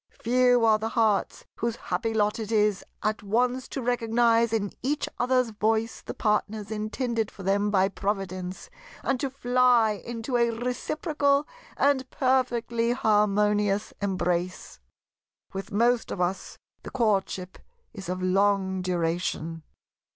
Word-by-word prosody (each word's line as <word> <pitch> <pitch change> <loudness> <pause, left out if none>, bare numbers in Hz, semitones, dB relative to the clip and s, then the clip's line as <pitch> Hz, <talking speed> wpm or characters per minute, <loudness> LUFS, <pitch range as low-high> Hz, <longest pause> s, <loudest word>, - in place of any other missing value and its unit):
Few 245 0 +4
are 215 -1 +4
the 220 +1 -2
hearts 220 -4 +1
whose 235 0 -1
happy 230 -1 -2
lot 210 0 +1
is 210 -2 +1 0.2
at 215 0 0
once 245 +5 0
to 270 - -5
recognize 230 -1 +2
in 205 -3 -1
each 285 +4 -1
other's 250 -1 +2
voice 220 +1 0
the - - -7
partner 210 0 0
intended 220 +1 -2
for 195 - -11
them 200 +2 +1
by 195 -2 +3
Providence, 190 -2 -4 0.3
and 270 -2 0
to 275 - -1
fly 250 -3 +3
into 230 +4 -3
a 235 0 +3
reciprocal 280 +5 0 0.3
and 270 -2 +2
perfectly 240 -3 +1
harmonious 210 -2 +2
embrace. 180 - -2 0.7
With 195 0 -6
most 235 +3 +2
of - - -5
us 180 +1 -2 0.2
the - - -8
courtship 195 -6 -1 0.3
is 195 -5 -8
of 185 0 -3
long 190 0 +2
duration. 165 -2 -2
220 Hz, 130 wpm, -26 LUFS, 195-245 Hz, 0.7 s, Few